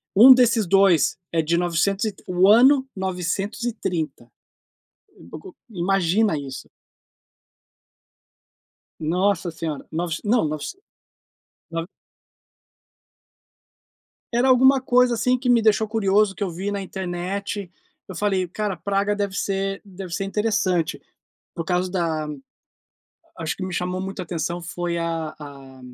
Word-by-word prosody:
um 250 Hz, +6 st, +10 dB
desses 235 Hz, -5 st, +3 dB
2 190 Hz, -6 st, +4 dB
é 165 Hz, -, +2 dB
de 165 Hz, +2 st, 0 dB
nocentos 175 Hz, +4 st, 0 dB
e 215 Hz, -, -1 dB
t -, -, -21 dB
o 180 Hz, +1 st, +3 dB
ano 260 Hz, +5 st, +6 dB
930, 190 Hz, -, -3 dB, 1.0 s
o 155 Hz, -, -9 dB
o -, -, -18 dB
imagina 195 Hz, -1 st, +1 dB
isso. 135 Hz, -2 st, -7 dB, 2.3 s
Nossa 175 Hz, +2 st, 0 dB
senhora, 160 Hz, -3 st, -5 dB
nove 165 Hz, 0 st, -2 dB
não 220 Hz, -3 st, +2 dB
novec 155 Hz, -, -5 dB, 1.0 s
no 165 Hz, 0 st, -3 dB, 2.5 s
Era 245 Hz, +3 st, +3 dB
alguma 265 Hz, +1 st, +5 dB
coisa, 250 Hz, -2 st, +3 dB
assim, 250 Hz, +3 st, +1 dB
que 250 Hz, 0 st, -1 dB
me 240 Hz, -1 st, +5 dB
deixou 220 Hz, 0 st, +3 dB
curioso 205 Hz, -2 st, +2 dB
que 205 Hz, -, -3 dB
eu 195 Hz, -, -2 dB
vi 190 Hz, +4 st, -4 dB
na 200 Hz, -1 st, -3 dB
internet, 190 Hz, +1 st, -4 dB, 0.4 s
eu 185 Hz, -, -7 dB
falei 190 Hz, -1 st, 0 dB
cara 205 Hz, +2 st, -3 dB
Praga 200 Hz, +3 st, -1 dB
deve 200 Hz, -1 st, -2 dB
ser 195 Hz, 0 st, -2 dB
deve 190 Hz, -2 st, -8 dB
ser 195 Hz, +2 st, -2 dB
interessante, 195 Hz, -5 st, 0 dB, 0.5 s
por 165 Hz, -, -4 dB
causa 180 Hz, +1 st, 0 dB
da 160 Hz, -4 st, -1 dB, 1.1 s
acho 160 Hz, -2 st, -3 dB
que 190 Hz, -, -5 dB
me 185 Hz, -, -5 dB
chamou 180 Hz, +1 st, -2 dB
muito 190 Hz, 0 st, -5 dB
atenção 170 Hz, 0 st, -3 dB
foi 175 Hz, 0 st, -3 dB
a 165 Hz, -2 st, -3 dB
a 135 Hz, -3 st, -12 dB
190 Hz, 125 wpm, -23 LUFS, 170-210 Hz, 2.5 s, um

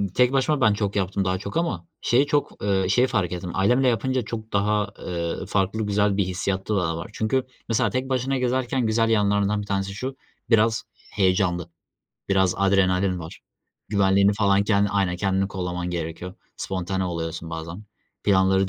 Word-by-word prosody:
tek 125 Hz, 0 st, +4 dB
başıma 140 Hz, +2 st, +1 dB
ben 110 Hz, -4 st, +5 dB
çok 105 Hz, -1 st, -2 dB
yaptım 95 Hz, 0 st, 0 dB
daha 95 Hz, 0 st, +1 dB
çok 100 Hz, -, -5 dB
ama 170 Hz, 0 st, -2 dB
şey 130 Hz, +4 st, +3 dB
çok, 145 Hz, -6 st, -1 dB
ııı, 95 Hz, -2 st, +1 dB
şey 125 Hz, +6 st, +4 dB
fark 100 Hz, -8 st, 0 dB
ettim. 90 Hz, 0 st, -4 dB
Ailemle 125 Hz, +7 st, +3 dB
yapınca 130 Hz, +2 st, +1 dB
çok 110 Hz, -1 st, -7 dB
daha, 105 Hz, +1 st, +1 dB
ııı, 85 Hz, +1 st, -3 dB
farklı 100 Hz, +2 st, 0 dB
güzel 105 Hz, -1 st, +1 dB
bir 100 Hz, -, +3 dB
hissiyatı 95 Hz, +3 st, -2 dB
daha 80 Hz, -3 st, 0 dB
var. 85 Hz, -, -7 dB
Çünkü 115 Hz, +4 st, 0 dB, 0.3 s
mesela 115 Hz, -, +2 dB
tek 130 Hz, +1 st, -2 dB
başına 130 Hz, +1 st, 0 dB
gezerken 125 Hz, 0 st, 0 dB
güzel 115 Hz, +1 st, +2 dB
yanlarından 105 Hz, -1 st, +2 dB
bir -, -, -6 dB
tanesi 100 Hz, -1 st, -2 dB
şu, 130 Hz, +6 st, -5 dB, 0.3 s
biraz 115 Hz, -1 st, +3 dB, 0.3 s
heyecanlı, 90 Hz, -3 st, +1 dB, 0.6 s
biraz 95 Hz, -2 st, +3 dB
adrenalin 95 Hz, -1 st, +2 dB
var. 80 Hz, -1 st, -9 dB, 0.5 s
Güvenliğini 100 Hz, 0 st, +3 dB
falan 100 Hz, -1 st, +2 dB
kendin 100 Hz, -1 st, +2 dB
Aynen, 95 Hz, -3 st, 0 dB
kendini 95 Hz, +1 st, 0 dB
kollaman 90 Hz, -2 st, -3 dB
gerekiyor. 85 Hz, +2 st, -5 dB, 0.2 s
Spontane 95 Hz, 0 st, -2 dB
oluyorsun 80 Hz, -2 st, -4 dB
bazen. 80 Hz, +5 st, -6 dB, 0.4 s
Planları 95 Hz, -1 st, +3 dB
100 Hz, 165 wpm, -24 LUFS, 95-110 Hz, 0.6 s, ben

